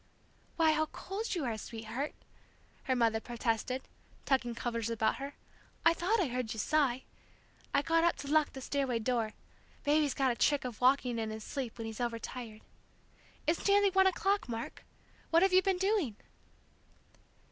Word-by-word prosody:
"Why, 320 -2 +4
how 310 0 +1
cold 400 +7 -4
you 325 -6 -1
are, 235 -2 -1
sweetheart!" 230 +7 -5 0.7
her 260 - +1
mother 230 -2 +2
protested, 240 +2 -2 0.4
tucking 255 -3 +1
covers 230 -1 -2
about 220 -1 +1
her. 280 +1 -6 0.5
"I 330 - +7
thought 370 +7 +1
I 375 - +3
heard 250 -3 -3
you 220 - -6
sigh! 265 0 +2 0.7
I 280 - +2
got 330 +1 +3
up 340 - +3
to 280 - -8
lock 305 +1 +3
the 265 - -7
stairway 265 -3 0
door; 230 -1 0 0.5
Baby's 295 -2 +2
gotten 265 -2 +2
a - - -2
trick 285 +2 +2
of 245 -2 -6
walking 250 -2 +3
in 220 -1 -2
his 220 0 -6
sleep 255 -3 -5
when 225 - -5
he's 225 +1 -5
overtired. 230 -1 -4 0.8
It's 325 +5 +1
nearly 400 0 +5
one 380 0 +5
o'clock, 390 -2 +1
Mark! 230 0 -5 0.5
What 335 +2 +5
have 385 -1 +3
you 370 - +7
been 385 -1 +1
doing?" 380 - +1
265 Hz, 170 wpm, -32 LUFS, 230-330 Hz, 0.8 s, I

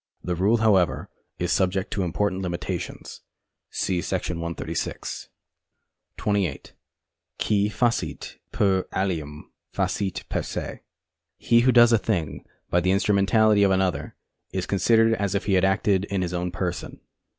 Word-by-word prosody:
The 90 - -2
rule, 100 +7 +2
however, 100 -6 +2 0.3
is 90 0 -1
subject 95 0 0
to 100 - -1
important 95 +2 -1
limitations. 85 -3 -5 0.5
See 90 -2 -1
§ - - -5 0.2
136. 85 -1 -4 0.9
28. 100 -8 -1 0.6
Qui 105 -1 +1
facit 105 - -2
per 95 -2 +1
alium, 80 -6 -3 0.2
facit 95 -3 -2
per - - -1
se. - - -4
Co. - - -5
Litt. - - -6
258a. - - -15 0.6
He 115 - +3
who 125 +2 +4
does 120 -1 +6
a 115 - +5
thing 90 -6 -2 0.3
by 90 - +4
the 90 +1 0
instrumentality 100 +2 +3
of 100 - +5
another 95 -6 0 0.4
is 95 -1 -2
considered 115 +3 +3
as 100 -3 -1
if 100 - -1
he 100 - +1
had 95 -1 +3
acted 95 0 +2
in 100 -2 -2
his 90 0 -3
own 90 0 -1
person. 90 -1 -4
95 Hz, 150 wpm, -24 LUFS, 90-105 Hz, 0.9 s, does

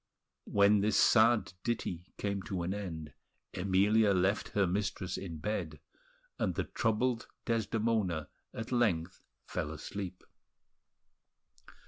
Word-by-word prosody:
When 100 +1 +5
this 105 +1 +2
sad 115 -4 +5
ditty 95 -7 -2
came 100 -1 -2
to 90 -3 -2
an 90 +3 -1
end, 80 -8 -6 0.4
Emilia 100 +3 +3
left 95 +3 +1
her 100 - +5
mistress 95 0 -2
in 85 -4 -5
bed; 105 +8 -3 0.6
and - - 0
the - - 0
troubled 120 +1 0 0.2
Desdemona 110 - 0 0.2
at 115 +2 -6
length 95 -9 +1 0.2
fell 75 - -3
asleep. 90 +4 -6
100 Hz, 110 wpm, -32 LUFS, 90-110 Hz, 0.6 s, When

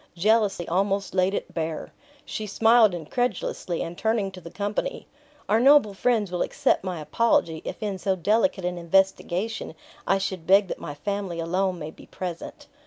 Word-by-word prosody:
Jealousy 200 -1 +2
almost 195 +3 0
laid 190 +1 +2
it - - -5
bare. 160 -2 -4 0.3
She 215 - -5
smiled 225 -1 +5
incredulously, 175 -1 -2
and 170 - -6
turning 220 -1 0
to 185 -1 -11
the 170 - -9
company, 210 - -3 0.4
"Our 215 +2 +3
noble 265 -5 +6
friends 215 -2 +1
will 180 - -2
accept - - +1
my 185 -3 -4
apology, 160 -2 +1
if - - -6
in 200 -3 -3
so 190 0 0
delicate 205 - +1
an 180 0 -2
investigation, 190 +2 0 0.3
I 195 - +4
should 190 -3 -4
beg 195 0 +5
that - - -4
my 145 -2 -6
family 195 +1 -3
alone 180 +2 0
may 155 -1 -6
be - - -16
present." 175 -3 -7
195 Hz, 170 wpm, -25 LUFS, 175-210 Hz, 0.4 s, noble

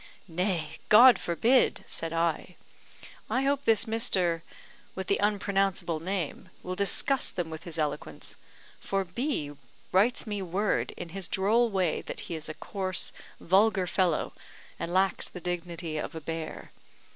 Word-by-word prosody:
"Nay, 170 -3 -2
God 235 0 +9
forbid!" 230 +9 +2
said 165 -1 -4
I. 165 +1 -1 0.7
"I 260 - +1
hope 280 0 0
this 225 0 +4
Mr., 185 -7 +2 0.5
with 190 - -4
the 200 - +1
unpronounceable 195 -4 0
name, 185 0 -3
will 180 - -4
disgust 200 +8 +2
them 170 -3 -3
with 160 +1 -8
his 165 -2 -6
eloquence; 150 -2 -4 0.4
for 195 0 -1
B 180 - -2 0.4
writes 210 +7 +3
me 205 -2 -3
word, 190 +4 0
in 175 - -6
his 190 +1 -4
droll 225 +5 +2
way, 185 -6 0
that - - -6
he - - -6
is 160 -1 -5
a 155 - -5
coarse, 190 -2 -1 0.3
vulgar 195 +1 +3
fellow, 180 -3 0 0.5
and 170 - -3
lacks 190 +1 +2
the 180 - -8
dignity 170 -2 -4
of - - -5
a 160 - -5
bear. 160 +1 -6
185 Hz, 145 wpm, -28 LUFS, 165-205 Hz, 0.7 s, God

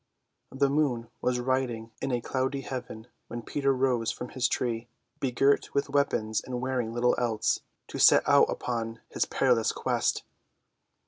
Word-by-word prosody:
The 140 +1 +2
moon 135 -5 0
was 125 0 +1
riding 120 -3 -1
in 135 - -1
a 120 -1 0
cloudy 130 +3 -1
heaven 125 -4 -6 0.2
when 120 0 -6
Peter 140 +2 0
rose 125 -3 +1
from 125 - -5
his 130 -1 0
tree, 120 -1 -2 0.3
begirt 135 +2 +1
with 140 0 0
weapons 110 -6 +1
and 125 -1 -4
wearing 125 -3 -1
little 120 +1 +2
else, 115 -3 +1 0.3
to - - -6
set - - +6
out - - +5
upon 115 -2 -3
his - - -1
perilous 120 -5 +2
quest. - - 0
125 Hz, 150 wpm, -28 LUFS, 115-135 Hz, 0.3 s, set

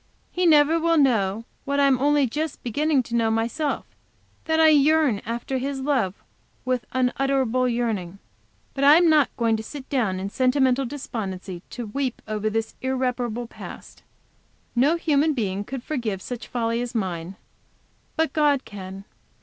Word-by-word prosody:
He 360 0 +1
never 310 +1 +5
will 330 0 +2
know, 225 -6 +2 0.2
what 280 +1 -1
I 280 - +5
am 265 -2 +3
only 290 +1 +3
just 300 +5 -4
beginning 285 +3 +1
to 235 0 -5
know 230 -1 +2
myself, 235 +7 -1 0.6
that 320 0 +1
I 320 0 +7
yearn 300 -6 +4
after 235 +3 -2
his 270 +1 -3
love 255 -9 0 0.5
with 255 -4 -1
unutterable 255 -1 +1
yearning. 215 -7 -2 0.6
I 280 +2 +6
am 340 -2 +5
not 300 -3 +4
going 230 -2 +2
to - - -4
sit 270 +3 -9
down 220 -9 0
in 195 +1 -4
sentimental 260 +1 +2
despondency 195 -9 -5
to 240 - -6
weep 255 +4 -3
over 215 0 -1
this 225 +1 -2
irreparable 250 -2 -1
past. 230 - -11 0.7
No 275 +7 +4
human 305 -2 +2
being 200 -4 -2
could 255 +3 -6
forgive 235 -11 -3
such 245 -1 -6
folly 230 -1 -1
as 245 0 -5
mine; 185 -3 -3 0.8
but 320 0 0
God 290 -3 +2
can. 195 -1 -8
255 Hz, 155 wpm, -24 LUFS, 225-285 Hz, 0.8 s, I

